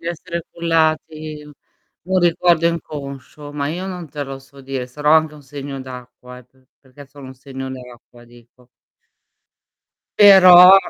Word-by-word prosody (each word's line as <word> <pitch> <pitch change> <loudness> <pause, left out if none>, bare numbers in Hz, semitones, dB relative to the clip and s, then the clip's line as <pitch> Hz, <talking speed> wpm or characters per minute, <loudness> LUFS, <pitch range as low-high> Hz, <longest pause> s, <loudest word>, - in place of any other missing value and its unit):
Di 165 - -12
essere 170 0 -6
cullati, 155 -2 -2
u 150 0 -15 0.6
un 190 - +3
ricordo 170 -1 +2
inconscio, 145 -3 -6
ma 145 -1 -3
io 180 +5 -5
non 180 -4 -7
te 145 0 -6
lo 135 0 -8
so 135 +1 -18
dire, 135 -1 -5
sarò 150 +4 0
anche 160 -1 +3
un 150 - -15
segno 140 0 -8
d'acqua 125 -1 -12
eh, 125 - -17
p 130 +2 -32 0.2
perché 135 +1 -16
sono 140 -1 -14
un 130 - -11
segno 130 0 -8
d'acqua, 125 -1 -13
dico. 120 +1 -21 1.5
Però 185 -2 +9
145 Hz, 155 wpm, -19 LUFS, 130-165 Hz, 1.5 s, Però